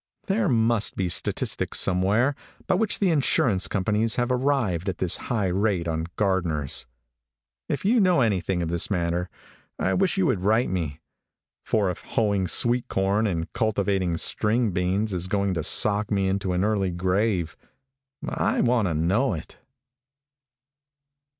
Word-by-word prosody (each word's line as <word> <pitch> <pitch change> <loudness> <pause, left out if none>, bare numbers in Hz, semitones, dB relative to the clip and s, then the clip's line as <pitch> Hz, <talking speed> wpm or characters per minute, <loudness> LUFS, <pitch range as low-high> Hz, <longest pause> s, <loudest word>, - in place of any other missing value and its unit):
There 200 -1 0
must 115 -3 +1
be 95 -2 -1
statistics 85 - 0
somewhere 100 +9 +2 0.3
by - - +1
which 210 +3 +2
the 195 -4 +1
insurance 125 - +2
companies 105 +3 0
have 120 0 0
arrived 125 - 0
at 90 - -4
this 90 -2 +1
high 105 -7 0
rate 95 -2 0
on 80 0 -2
gardeners. 85 -11 -1 0.8
If 140 +2 -3
you 235 +4 +3
know 180 -7 +3
anything 95 -5 0
of 80 - -3
this 85 0 0
matter, 90 -2 -1 0.5
I - - 0
wish 190 0 +1
you 190 - +2
would 100 - 0
write 110 +2 +1
me, 80 -5 -3 0.6
for 100 -4 0
if 90 - -9
hoeing 100 -4 0
sweet 120 +4 +2
corn 100 +3 0
and 85 -4 -3
cultivating 100 -6 0
string 110 +5 +1
beans 95 +4 -1
is 90 0 -2
going 100 0 0
to 85 - -2
sock 105 +4 +2
me 100 -2 0
into 95 -1 -1
an 90 +1 0
early 100 -3 0
grave 90 -1 -1 0.7
I - - -1
want 120 -4 +2
to 80 - -2
know 95 - +1
it." 80 - -10
100 Hz, 150 wpm, -24 LUFS, 90-115 Hz, 0.8 s, you